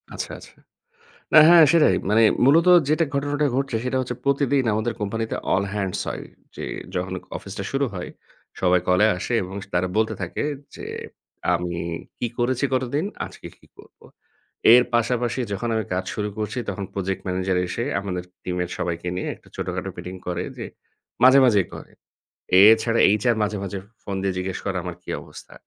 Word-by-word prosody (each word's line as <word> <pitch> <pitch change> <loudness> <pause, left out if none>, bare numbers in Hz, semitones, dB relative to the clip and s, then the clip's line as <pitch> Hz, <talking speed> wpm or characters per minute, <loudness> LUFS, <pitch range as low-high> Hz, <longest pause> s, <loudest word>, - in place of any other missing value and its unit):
আচ্ছা, - - -5
আচ্ছা। - - -16 0.8
না, - - +9
হ্যাঁ, 170 -1 +9
সেটাই। 165 -2 +5
মানে 110 +2 +5 0.2
মূলত 165 +6 +5 0.2
যেটা 155 +2 +3
ঘটনাটা 145 +1 0
ঘটছে, 135 -2 -1
সেটা 130 +1 0
হচ্ছে 125 -1 -4
প্রতিদিন 140 -1 +2
আমাদের 110 +2 -1
কোম্পানিতে 110 +2 -2 0.2
all 95 - +2
hands 100 -3 -2
হয়। - - -5 0.3
যে - - -5 0.3
যখন 90 0 -2 0.2
অফিসটা 100 0 -7
শুরু 135 +1 +1
হয়, 90 -2 -5 0.5
সবাই 90 0 +3
কলে 90 +3 +4
আসে 105 - -4
এবং 95 +2 -8 0.2
তারা 90 +1 +1
বলতে 110 0 +2
থাকে 90 - -3 0.3
যে, - - -8 0.7
আমি 85 0 -2 0.4
কি 120 - 0
করেছি 125 +2 0
গতদিন? 130 +5 0 0.2
আজকে - - -11
কি - - -23
করবো? - - -18 0.7
এর 125 +1 +8
পাশাপাশি, 120 +1 0
যখন 115 +4 -3
আমি 110 -2 -1
কাজ 95 +1 -2
শুরু 105 0 -2
করছি, 105 +3 -3
তখন 100 - -4
প্রজেক্ট 95 -1 -3
ম্যানেজার 95 0 0
এসে 115 - -3 0.2
আমাদের 90 -3 -4 0.2
টিমের 90 -1 -2
সবাইকে 85 0 -3
নিয়ে 90 - -3
একটা - - -24
ছোটখাটো - - -4
মিটিং 90 +1 -7
করে, 90 0 -2
যে - - -5 0.6
মাঝে, 130 +2 +8
মাঝেই 105 -7 +3
করে। - - -10 0.7
এছাড়া 110 +2 +6 0.2
HR 120 0 +3
মাঝে, 105 0 -1
মাঝে 100 0 -4
ফ - - -25 0.2
ফোন 100 - -4
দিয়ে 95 -1 0
জিজ্ঞেস 90 0 -3
করে 95 -1 -1
আমার 90 -2 -5
কি - - -11
অবস্থা? - - -13
105 Hz, 170 wpm, -23 LUFS, 95-125 Hz, 0.8 s, না